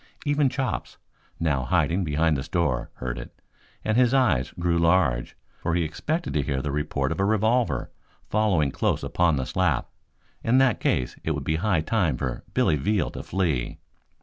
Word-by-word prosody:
Even 145 -1 +3
Chops, 130 0 -3 0.4
now 75 -5 +1
hiding 85 +9 +1
behind 80 0 +1
the 70 - -2
store, 70 -4 -1
heard 60 -1 -4
it, - - -11 0.5
and 110 +1 +1
his 125 +1 +4
eyes 85 - +2
grew 85 -1 +1
large, 85 -8 +2 0.2
for 85 - -1
he 85 - +2
expected 155 - -2
to 75 - +2
hear 70 -1 -1
the 70 +2 -3
report 70 -2 -1
of 80 - -3
a - - +2
revolver 110 +4 +1 0.4
following 95 -10 +2
close - - 0
upon 85 -3 +2
the 65 -2 -1
slap. - - 0 0.5
In 120 +3 +3
that 135 -1 +4
case 60 -2 0
it 80 - 0
would 75 - -4
be 80 +3 0
high 95 -2 +1
time 85 - +1
for 65 -2 -3
Billy 75 - +3
Veal 100 +6 0
to - - -6
flee. 85 -10 -1
85 Hz, 175 wpm, -25 LUFS, 70-110 Hz, 0.5 s, his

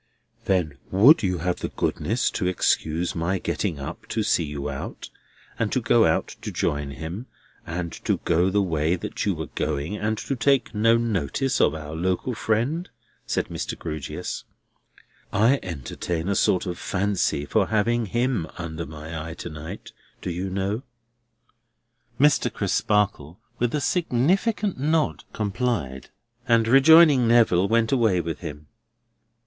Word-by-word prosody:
"Then 80 -8 0
would 115 - +6
you 90 -3 0
have 90 -1 0
the - - -3
goodness 115 +5 -1
to 95 - -1
excuse 85 -2 0
my 85 +3 -1
getting 90 -2 -2
up 70 - -7
to - - -1
see - - +2
you 75 -1 -5
out, 70 -2 -6 0.5
and - - 0
to - - +2
go - - +4
out - - +1
to - - -5
join 75 -1 -1
him, 80 - -6 0.4
and 85 0 -4
to - - +2
go 85 +2 +3
the 100 +1 +2
way 80 -1 +1
that 90 - -4
you 100 - +1
were 80 -2 -6
going, 75 +5 -2
and 110 +1 -1
to 135 - -3
take 130 +1 +2
no 115 +2 +4
notice 115 - 0
of - - +3
our 75 -1 -7
local 95 +9 -1
friend?" 120 +11 -1 0.4
said - - -1
Mr. - - -4
Grewgious. 75 -3 -5 0.9
"I 115 +8 +3
entertain 85 +2 -4
a 100 - +1
sort 95 0 +2
of 90 -2 -4
fancy 95 -7 0
for - - +1
having 115 +1 +1
him 120 -5 0
under 85 -1 -5
my 80 +1 -7
eye 85 - -7
to 85 - -7
night, 75 +2 -8 0.3
do 90 - -4
you 90 +3 -3
know?" 100 +4 -2 1.4
Mr. 145 +1 +4
Crisparkle, 100 -7 0 0.2
with 120 +3 0
a - - +1
significant 180 - +1
nod 150 - 0
complied; 105 - -2 0.4
and 115 -2 +4
rejoining 135 0 +7
Neville, 110 -6 +4
went 115 0 +2
away 115 -9 +3
with 85 -1 -3
him. 75 -3 -8
95 Hz, 150 wpm, -24 LUFS, 80-120 Hz, 1.4 s, rejoining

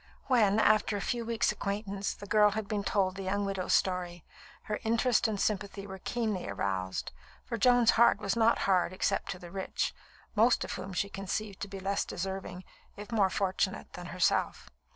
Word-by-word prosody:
When, 220 -6 +3
after 215 -1 +3
a - - -3
few 235 +4 -2
weeks' 230 -1 +1
acquaintance, 200 -1 -3
the 205 - -10
girl 210 0 +5
had 210 0 -4
been 205 -1 -2
told 195 -2 +1
the 195 - -7
young 200 +2 -1
widow's 195 -2 -1
story, 175 -3 -1 0.4
her 210 - -3
interest 230 +1 +2
and 210 -2 -2
sympathy 200 -1 -1
were 190 -1 -8
keenly 215 -4 -2
aroused, 95 -2 -2 0.3
for - - -3
Joan's 240 +1 +5
heart 235 -3 +5
was 200 -1 -1
not 230 0 +4
hard 185 -2 +2
except 185 - -1
to - - -3
the 175 -1 -11
rich, 190 0 -2 0.4
most 230 +3 +4
of - - -5
whom 190 - -6
she 190 +2 -1
conceived 195 +1 -4
to 200 - -4
be 195 0 -7
less 195 +1 0
deserving, 185 0 -5 0.3
if 205 +3 -9
more 205 -4 +3
fortunate, 190 0 -1
than 180 0 -7
herself. 180 +1 0
200 Hz, 185 wpm, -30 LUFS, 190-215 Hz, 0.4 s, girl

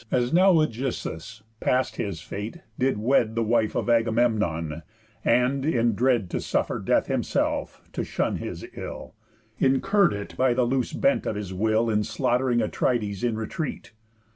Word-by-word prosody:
As 125 +2 +1
now 185 +3 +6
Ægisthus, 115 - -2 0.2
past 130 +1 0
his 95 -6 -3
fate, 105 - -6 0.2
did 130 -3 +2
wed 115 0 +2
The 115 - +1
wife 110 -1 +1
of - - -1
Agamemnon, 110 -9 +1 0.4
and 125 +3 +2
(in 120 -6 +2
dread 120 -2 +2
To - - -2
suffer - - -1
death - - +2
himself) - - -1
to - - -2
shun - - -1
his - - -6
ill, - - -7 0.5
Incurr'd 195 +9 +3
it 100 0 -6
by 130 -2 +2
the 125 - +2
loose 130 0 -1
bent 275 0 +1
of 110 - -1
his 100 -2 -5
will, 110 +4 +1
In 105 -2 +1
slaughtering 125 +2 +1
Atrides 105 -2 -1
in 120 -2 +1
retreat. 120 +7 -4
120 Hz, 155 wpm, -25 LUFS, 105-130 Hz, 0.5 s, now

